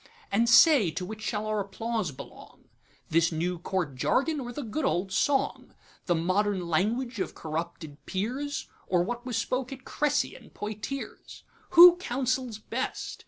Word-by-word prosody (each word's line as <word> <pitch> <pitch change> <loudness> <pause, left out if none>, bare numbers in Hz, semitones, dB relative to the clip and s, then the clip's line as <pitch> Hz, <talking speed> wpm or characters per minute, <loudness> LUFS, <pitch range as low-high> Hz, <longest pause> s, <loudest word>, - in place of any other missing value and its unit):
And 230 +4 +2
say, 250 - +7
to 175 +4 -4
which 215 +3 -8
shall 210 0 -2
our 215 0 -1
applause 210 -1 -3
belong, 130 - -13 0.4
This 165 +1 +3
new 170 +2 -2
Court 175 -5 -2
jargon, 275 - +1
or 245 -2 -5
the 280 +4 -5
good 235 +7 -3
old 190 -5 0
song? 275 +6 0 0.3
The 175 - +3
modern 185 +2 0
language 225 +8 0
of - - -3
corrupted 160 -2 -6
peers, 255 +9 -3 0.2
Or 175 -2 +2
what 240 +5 -5
was 240 -3 -1
spoke 255 +2 -2
at 260 -1 -9
Cressy 295 -1 0
and 240 - -15
Poictiers? 215 +6 -6 0.3
Who 350 0 +11
counsels 255 - -2
best? 235 +4 -4
215 Hz, 155 wpm, -28 LUFS, 180-260 Hz, 0.4 s, Who